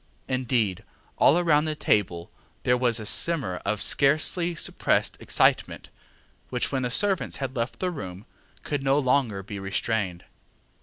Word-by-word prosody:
Indeed, 125 -7 -1 0.4
all 160 - +5
round 155 -2 +3
the 155 - -2
table 90 - 0 0.3
there 125 - +3
was 120 -2 +3
a 110 - -7
simmer 130 - +2
of 105 +1 +1
scarcely 155 +5 +2
suppressed - - 0
excitement, - - +1 0.6
which, 125 -1 -1
when 135 -2 -1
the 125 - -1
servants 195 +7 +1
had 135 -1 -5
left 115 0 -3
the 185 -1 -1
room, 95 - -8 0.4
could 145 -2 -3
no 135 +1 +2
longer 125 -7 0
be 100 +1 -7
restrained. 95 -2 -2
125 Hz, 145 wpm, -25 LUFS, 105-145 Hz, 0.6 s, all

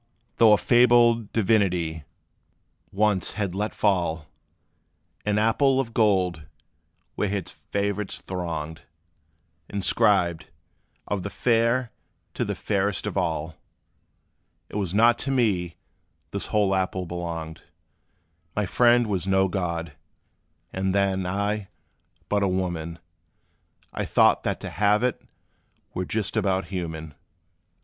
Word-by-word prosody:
Though 110 -2 +7
a - - +6
fabled 120 -2 +4
divinity 90 -8 +1 0.9
once 105 -2 +1
had 100 -4 -2
let 105 +3 -3
fall 85 -6 +1 1.0
An 105 0 +2
apple 130 +5 +3
of 115 -4 -2
gold, 95 -8 +1 0.7
where 105 - -1
his 100 -3 -3
favorites 100 0 -3
thronged, 80 -4 -5 0.9
Inscribed, 90 -4 +1 0.6
"Of 100 -2 -2
the 100 - -4
fair, 115 +2 +1 0.4
to - - -1
the - - -3
fairest 100 -1 -1
of - - -4
all!" 80 0 -2 1.1
It - - -11
was 95 -5 -2
not 115 +2 +5
to - - -3
me 100 -10 +1 0.6
this - - -3
whole 105 -2 +2
apple 95 -1 -1
belonged: 85 -2 -5 0.9
My 105 - 0
friend 120 +4 +4
was 95 -3 -2
no 95 0 +3
god 85 -3 -3 0.8
and 95 0 -1
then 95 -2 +1
I, 100 +2 -1 0.6
but 105 0 +1
a 100 - +2
woman; 85 -3 -2 1.0
I - - -2
thought - - +4
that - - -1
to - - -6
halve 105 +5 +2
it 125 -1 0 0.7
were 90 - -2
just 105 +1 -2
about 95 -1 0
human. 80 -4 -5
95 Hz, 120 wpm, -25 LUFS, 90-105 Hz, 1.1 s, Though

